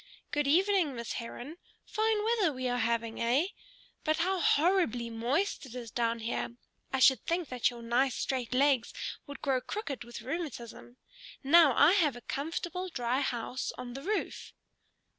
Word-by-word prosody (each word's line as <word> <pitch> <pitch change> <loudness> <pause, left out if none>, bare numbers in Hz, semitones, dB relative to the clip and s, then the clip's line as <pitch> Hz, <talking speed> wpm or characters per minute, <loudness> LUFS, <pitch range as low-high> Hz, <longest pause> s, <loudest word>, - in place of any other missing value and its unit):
"Good 295 -1 0
evening, 360 -2 +3
Miss 235 -1 -4
Heron. 245 +6 -7 0.3
Fine 435 -1 +1
weather 435 -7 +2
we 255 -2 -3
are 245 0 0
having, 230 0 -1
eh? 260 +10 +2 0.5
But 310 0 +1
how 370 +3 +1
horribly 295 - +2
moist 260 - 0
it 245 - -11
is 235 -3 -7
down 230 0 0
here! 230 +1 -3 0.4
I 265 - 0
should 265 0 +5
think 340 -2 0
that 250 -2 +1
your 240 -1 -9
nice 245 +2 +2
straight 255 -4 -2
legs 260 -2 +2 0.3
would 285 - -9
grow 265 -2 +1
crooked 290 - -5
with 235 -1 -9
rheumatism. 255 -4 -6 0.5
Now 290 -2 +6
I 295 +4 +7
have 325 - +3
a 245 - -9
comfortable, 345 +7 -3
dry 245 -4 -1
house 255 -1 -2
on 250 -1 -6
the 270 - -6
roof." 410 +6 -3
270 Hz, 160 wpm, -31 LUFS, 240-335 Hz, 0.5 s, I